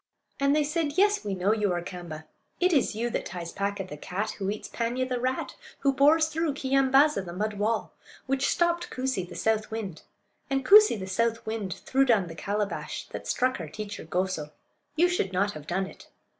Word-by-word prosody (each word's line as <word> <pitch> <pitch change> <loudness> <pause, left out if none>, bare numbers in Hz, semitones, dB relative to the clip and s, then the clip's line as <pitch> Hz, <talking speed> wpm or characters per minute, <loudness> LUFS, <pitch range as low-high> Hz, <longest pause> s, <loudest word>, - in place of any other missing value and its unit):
And 280 +1 +3
they 305 - +3
said: 300 0 -1
"Yes, 410 - +4
we 200 -2 -2
know 190 +3 +2
you 210 -3 +1
are 175 - -1
Kaamba; 175 -4 -7 0.3
it 365 0 +3
is 270 -7 +2
you 235 +2 -1
that - - -2
ties 170 -1 -6
Paaka, 200 0 -2
the 150 - -8
cat; 200 +8 -3
who 195 -1 -1
eats 210 +1 -4
Paanya, 245 +2 -1
the 250 -1 -1
rat; 255 +1 -1 0.3
who 275 -1 +3
bores 305 +4 +5
through 320 -2 -1
Keeyambaaza, 270 -2 +3
the 175 - -7
mud 205 +3 -3
wall; 220 +2 0 0.3
which 270 +1 +1
stopped 345 0 +1
Koosee, 255 -9 -2
the - - -9
south 220 -1 0
wind; 215 -7 -5 0.5
and 270 -1 0
Koosee, 420 - +7
the 190 - -4
south 230 +4 0
wind, 215 -5 -3
threw 270 +1 +3
down 225 -8 +3
the 165 - -8
calabash 205 +4 -3
that - - -7
struck 255 -2 +1
our 160 -3 -6
teacher 210 +3 -6
Goso. 175 -2 -2 0.5
You 340 +3 +5
should 275 - -1
not 200 +3 +2
have 155 -3 -10
done 190 +3 0
it." - - -13
220 Hz, 200 wpm, -27 LUFS, 190-275 Hz, 0.5 s, Koosee